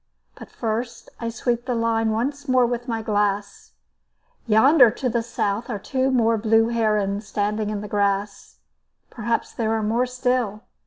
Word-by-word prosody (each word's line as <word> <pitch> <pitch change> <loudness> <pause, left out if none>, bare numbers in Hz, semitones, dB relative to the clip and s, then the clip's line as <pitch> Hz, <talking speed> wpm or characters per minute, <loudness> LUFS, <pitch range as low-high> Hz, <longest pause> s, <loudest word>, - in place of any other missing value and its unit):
But - - -12
first 230 +1 -4
I 230 - -3
sweep 235 +1 -2
the 250 - 0
line 225 -1 +1
once 275 +7 -2
more 255 -1 +4
with 240 +1 -3
my 225 -2 -2
glass. 205 -1 -2 0.7
Yonder 250 +4 +6
to 250 +3 -3
the 235 0 0
south 225 -1 -2
are 220 - -2
two 260 +6 -1
more 230 -3 +2
blue 225 +1 +3
herons 210 -3 0
standing 210 +1 -1
in 210 -1 -3
the 210 - -6
grass. 200 0 -2 0.5
Perhaps 235 -1 -2
there 225 -1 -1
are 220 -1 -1
more 235 +4 +1
still. 250 -4 -1
225 Hz, 160 wpm, -23 LUFS, 210-240 Hz, 0.7 s, Yonder